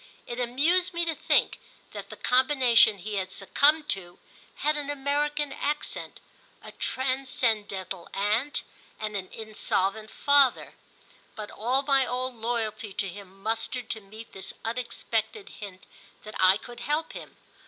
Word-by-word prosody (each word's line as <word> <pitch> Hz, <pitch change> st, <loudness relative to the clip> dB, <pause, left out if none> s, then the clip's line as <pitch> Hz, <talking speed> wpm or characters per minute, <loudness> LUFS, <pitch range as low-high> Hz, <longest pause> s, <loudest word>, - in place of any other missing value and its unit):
It 240 Hz, +1 st, -5 dB
amused 310 Hz, +10 st, +2 dB
me 340 Hz, 0 st, +2 dB
to 330 Hz, -, 0 dB
think -, -, +2 dB, 0.3 s
that -, -, -8 dB
the -, -, -9 dB
combination 250 Hz, -4 st, +5 dB
he 205 Hz, +2 st, -4 dB
had 190 Hz, -1 st, -2 dB
succumbed 295 Hz, +11 st, +3 dB
to 175 Hz, -2 st, -2 dB, 0.4 s
had 300 Hz, +1 st, +1 dB
an 290 Hz, -1 st, -3 dB
American 290 Hz, +1 st, 0 dB
accent, 295 Hz, +1 st, -3 dB, 0.4 s
a -, -, -9 dB
transcendental 220 Hz, -8 st, -1 dB
aunt 215 Hz, +9 st, 0 dB, 0.4 s
and 215 Hz, -1 st, -3 dB
an 185 Hz, -2 st, -4 dB
insolvent 215 Hz, -1 st, -1 dB
father; 285 Hz, 0 st, +4 dB, 0.6 s
but 210 Hz, -1 st, -7 dB
all 255 Hz, +5 st, +1 dB
my 275 Hz, -1 st, +4 dB
old 255 Hz, +1 st, -2 dB
loyalty 225 Hz, -2 st, -2 dB
to 195 Hz, -, -1 dB
him 195 Hz, +1 st, -11 dB
mustered 225 Hz, +3 st, -1 dB
to 220 Hz, -, -2 dB
meet 215 Hz, +3 st, -12 dB
this 190 Hz, -, -7 dB
unexpected 235 Hz, -, -2 dB
hint 195 Hz, -3 st, -9 dB, 0.4 s
that 215 Hz, -, -9 dB
I 185 Hz, +1 st, +7 dB
could 240 Hz, +2 st, -11 dB
help 300 Hz, +3 st, -1 dB
him. -, -, -10 dB
235 Hz, 140 wpm, -27 LUFS, 205-280 Hz, 0.6 s, I